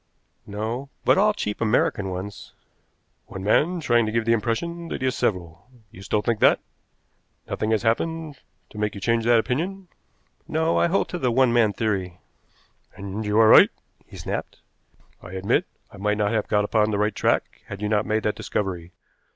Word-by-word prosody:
"No, 110 +6 -4 0.2
but - - +4
all 210 +1 +4
cheap 105 - -4
American 105 -2 +1
ones." 95 +2 -7 0.7
"One 95 - -8
man 155 - +2
trying 120 -7 +2
to - - -2
give 115 0 0
the 115 - +3
impression 165 +10 -2
that - - -5
he - - +2
is 130 - +1
several. 90 +1 -3 0.2
You 105 - -13
still 105 +1 -1
think 115 -2 0
that? - - +5 0.9
Nothing 110 - -2
has 110 -3 +1
happened 155 +5 -1 0.3
to 105 - -9
make 105 0 -1
you - - -6
change 115 +3 0
that 120 0 +5
opinion?" 175 +11 -2 0.6
"No, 160 +1 +1
I - - +3
hold 190 +4 +1
to 180 - -4
the 130 - +1
one 125 0 +3
man 115 -3 +4
theory." 95 -4 -2 0.8
"And 100 +2 -5
you 105 +1 +1
are 110 -1 +6
right," - - +8 0.4
he - - -12
snapped. - - -5 0.6
"I 90 - -11
admit 95 +1 0 0.2
I - - -13
might 105 +1 0
not 105 -1 +1
have 110 -2 -1
got 105 0 +2
upon 105 0 +2
the 105 - -1
right 105 +1 +1
track - - -1
had 100 - -7
you 105 - -2
not 105 0 +1
made 110 0 0
that 105 - +1
discovery. 95 -5 -4
110 Hz, 190 wpm, -24 LUFS, 100-125 Hz, 0.9 s, right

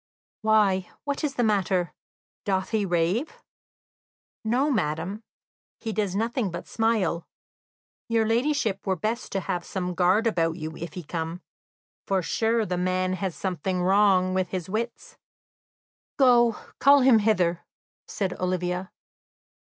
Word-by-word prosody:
"Why, 210 -4 +3
what 285 +1 -3
is 285 -2 -1
the 245 - +1
matter? 195 -5 +1 0.5
Doth 190 -2 -1
he 215 -3 +1
rave?" 180 - 0 1.1
"No, 255 +7 +1
madam, 180 - -1 0.6
he 225 -2 -4
does 200 -2 -1
nothing 230 0 0
but 175 - -6
smile. 220 -7 0 0.8
Your 225 -1 +2
ladyship 225 -4 0
were 190 - +2
best 215 +7 -3
to 195 - 0
have 175 0 -3
some 180 -1 -3
guard 185 +5 +3
about 165 -7 +1
you 160 0 -6
if 170 -1 -7
he 180 - -6
come; 165 +2 -5 0.6
for, 190 -2 +1
sure, 225 +4 +1
the 180 -1 -2
man 185 +1 0
has 185 -1 -3
something 185 0 -2
wrong 190 -1 +4
with 185 -1 0
his 180 -2 -4
wits." 225 +5 -4 1.0
"Go, 240 -3 +5 0.3
call 280 0 +6
him 250 -3 +6
hither," 180 -5 +1 0.4
said 190 -3 -2
Olivia. 180 0 -2
195 Hz, 135 wpm, -26 LUFS, 180-225 Hz, 1.1 s, call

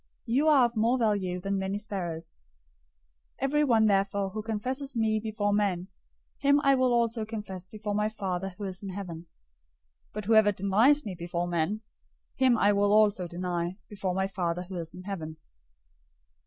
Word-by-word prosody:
You 265 +6 +2
are 285 -5 +6
of 240 0 -3
more 230 +4 +2
value 200 -6 0
than 195 +2 -2
many 190 +1 -2
sparrows. 175 - -5 1.0
010:032 - - -7
Everyone 270 -5 +3
therefore 195 -1 +1
who 215 - -4
confesses 255 +6 -3
me 220 -1 +1
before 210 -1 -1
men, 195 -3 0 0.5
him 285 0 +4
I 275 - +5
will 255 -1 +3
also 235 -1 +1
confess 205 -4 -6
before 210 +1 -5
my 210 +1 +1
Father 195 -3 -4
who 210 - -7
is 190 -2 -4
in 200 - -6
heaven. 180 -4 -6 0.8
010:033 - - -39
But 210 -1 -5
whoever 220 -1 +5
denies 220 +10 +3
me 200 - -4
before 175 0 -3
men, 175 +5 -1 0.5
him 255 -3 +4
I 205 -1 +4
will 200 0 +2
also 205 -4 +4
deny 175 +1 -3
before 190 -3 -3
my 190 0 +1
Father 180 -2 -2
who 185 +1 -9
is 165 -2 -5
in 180 - -9
heaven. 160 -5 -6
205 Hz, 170 wpm, -28 LUFS, 185-220 Hz, 1.0 s, are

